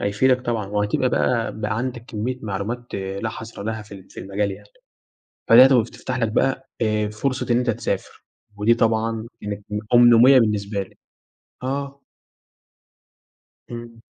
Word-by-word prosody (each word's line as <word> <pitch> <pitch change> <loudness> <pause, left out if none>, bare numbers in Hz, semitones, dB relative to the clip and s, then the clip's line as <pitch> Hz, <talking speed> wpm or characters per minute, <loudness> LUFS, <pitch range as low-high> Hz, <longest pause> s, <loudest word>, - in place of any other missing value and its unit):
هيفيدك 125 +6 +2
طبعًا، 115 -4 -2
وهتبقى 105 +5 0
بقى، 115 -3 0
بقى 105 0 -1
عندك 120 -1 -4
كميّة 120 +3 -4
معلومات 110 +4 -4
لا 95 +3 -3
حَصر 110 0 -8
لها 110 +1 -4
في 105 -1 -12
ال 95 -1 -14
في - - -9
المجال 100 +2 -2
يعني، 95 - -10 0.8
فلقيتها 130 +3 +8
وبتفتح 125 +2 -2
لك 115 -2 +1
بقى 135 +2 0
آآ، 105 -1 +1
فرصة 125 +5 -2
إن 120 - +4
أنت 125 -1 +1
تسافر 110 - -4 0.3
ودي 105 +3 +3
طبعًا 115 -1 0 0.2
كانت 105 0 -5
م 105 - -2 0.2
أمنية 120 +2 +7
بالنسبة 105 -3 0
لي، 95 - -14 0.7
آه. 140 +1 -4 1.7
إمم. 115 -1 -9
115 Hz, 145 wpm, -22 LUFS, 105-125 Hz, 1.7 s, فلقيتها